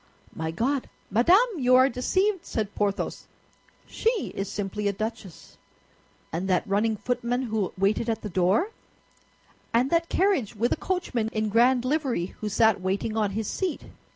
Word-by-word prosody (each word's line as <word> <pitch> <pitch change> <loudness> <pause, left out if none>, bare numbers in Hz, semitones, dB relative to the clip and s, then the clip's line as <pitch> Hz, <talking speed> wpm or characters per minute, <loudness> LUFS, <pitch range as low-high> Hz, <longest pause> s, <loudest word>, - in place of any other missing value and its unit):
"My 160 0 -3
God! 250 - -1 0.2
Madame, 345 - +5
you 255 -1 +4
are 260 +1 +7
deceived," 375 - 0
said 210 -3 -3
Porthos; 205 -1 -2 0.6
"she 455 -2 -1
is 195 0 -3
simply 205 +1 -3
a 200 - +1
duchess." 205 -3 -7 0.8
"And 175 +4 -2
that 185 -2 +1
running 210 +2 +1
footman 245 +2 -1
who 220 -5 -1
waited 205 +4 +1
at 225 -1 -2
the - - -3
door, 190 - +2 1.0
and 245 +4 +2
that 335 0 +2
carriage 370 - +1
with 230 +4 0
a - - +3
coachman 270 -12 -2
in 215 -1 -1
grand 245 +3 +3
livery 260 - -1
who 215 - -2
sat 220 -1 +3
waiting 195 +4 -1
on 215 -2 +1
his 220 -2 -2
seat?" 370 -5 -3
225 Hz, 155 wpm, -26 LUFS, 200-260 Hz, 1.0 s, are